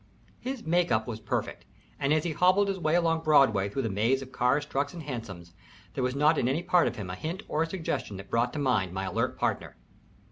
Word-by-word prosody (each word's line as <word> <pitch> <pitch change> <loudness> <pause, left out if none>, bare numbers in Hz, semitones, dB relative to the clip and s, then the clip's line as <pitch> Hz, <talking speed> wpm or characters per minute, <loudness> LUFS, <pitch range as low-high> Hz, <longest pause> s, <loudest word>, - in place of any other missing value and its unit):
His 260 -1 -5
make 175 +1 +1
up 110 -1 +2
was 110 -3 -5
perfect, 110 - -3 0.4
and 140 - 0
as 155 0 +3
he 170 - -1
hobbled 185 +5 +3
his 195 -1 -2
way 155 -1 +1
along 165 -2 +2
Broadway 135 -11 +4
through 135 +7 -2
the 115 - -1
maze 115 +7 +1
of 130 - -13
cars, 130 +4 +1
trucks, 145 +2 -2
and 165 - -7
hansoms, 105 - -7 0.4
there 130 - -2
was 125 +1 -1
not 150 +3 +3
in 120 - +1
any 145 +7 0
part 180 -1 +3
of - - -3
him 95 -4 -6
a - - -5
hint 170 - -5
or 155 - -1
a 165 - 0
suggestion 160 - -3
that 95 0 -11
brought 120 +1 +1
to - - -5
mind 110 -11 +1
my 95 +1 -3
alert - - -1
partner. - - -2
140 Hz, 240 wpm, -28 LUFS, 110-165 Hz, 0.4 s, Broadway